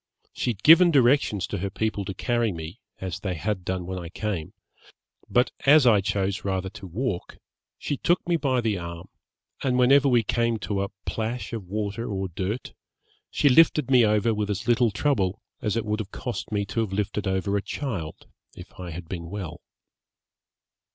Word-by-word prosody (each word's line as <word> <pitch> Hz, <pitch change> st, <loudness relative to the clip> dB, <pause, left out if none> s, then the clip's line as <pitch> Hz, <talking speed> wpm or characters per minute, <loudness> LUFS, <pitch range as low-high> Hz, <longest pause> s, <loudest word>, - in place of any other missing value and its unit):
She -, -, -2 dB
had 105 Hz, -4 st, -4 dB
given 170 Hz, +3 st, +8 dB
directions 130 Hz, -, +3 dB
to -, -, -4 dB
her 100 Hz, +2 st, -2 dB
people 105 Hz, 0 st, -2 dB
to 95 Hz, -1 st, -5 dB
carry 120 Hz, +1 st, 0 dB
me, 85 Hz, +4 st, -7 dB, 0.2 s
as 95 Hz, -1 st, -4 dB
they 95 Hz, -3 st, -3 dB
had 95 Hz, +3 st, -2 dB
done 95 Hz, -1 st, -3 dB
when 95 Hz, +1 st, -4 dB
I 85 Hz, -2 st, -7 dB
came, 95 Hz, -4 st, -4 dB, 0.8 s
but 125 Hz, +1 st, +3 dB, 0.2 s
as 145 Hz, -1 st, +7 dB
I 110 Hz, -5 st, +6 dB
chose 100 Hz, +1 st, -1 dB
rather 95 Hz, -1 st, -2 dB
to 100 Hz, -, -10 dB
walk, 100 Hz, 0 st, -3 dB, 0.4 s
she 145 Hz, -, -3 dB
took 175 Hz, +5 st, +1 dB
me 175 Hz, -, +2 dB
by 135 Hz, -6 st, +1 dB
the 110 Hz, -5 st, 0 dB
arm, 85 Hz, -1 st, -8 dB, 0.5 s
and 125 Hz, -2 st, +1 dB
whenever 135 Hz, +3 st, +5 dB
we 120 Hz, -2 st, +4 dB
came 115 Hz, +2 st, 0 dB
to 100 Hz, -2 st, -2 dB
a 100 Hz, -, -2 dB, 0.2 s
plash 115 Hz, +2 st, -3 dB
of 105 Hz, -5 st, -5 dB
water 105 Hz, +3 st, -3 dB
or 95 Hz, -1 st, -2 dB
dirt, 95 Hz, +8 st, -4 dB, 0.6 s
she -, -, +2 dB
lifted 150 Hz, 0 st, +5 dB
me 125 Hz, -2 st, +7 dB
over 105 Hz, +1 st, +3 dB
with 105 Hz, -1 st, -2 dB
as 105 Hz, +3 st, -3 dB
little 120 Hz, 0 st, +4 dB
trouble 105 Hz, -3 st, 0 dB, 0.2 s
as 105 Hz, -3 st, -1 dB
it 115 Hz, -, -1 dB
would 105 Hz, +1 st, -1 dB
have 105 Hz, -3 st, -4 dB
cost 120 Hz, 0 st, -5 dB
me 100 Hz, -1 st, 0 dB
to 100 Hz, +4 st, -3 dB
have 110 Hz, -4 st, -1 dB
lifted 105 Hz, 0 st, -2 dB
over 95 Hz, +1 st, 0 dB
a 100 Hz, -, +1 dB
child, 100 Hz, -, -5 dB, 0.3 s
if 90 Hz, +1 st, -13 dB
I 90 Hz, -1 st, -6 dB
had 85 Hz, +1 st, -7 dB
been 85 Hz, -1 st, -6 dB
well.' 85 Hz, -4 st, -6 dB
105 Hz, 190 wpm, -25 LUFS, 95-120 Hz, 0.8 s, given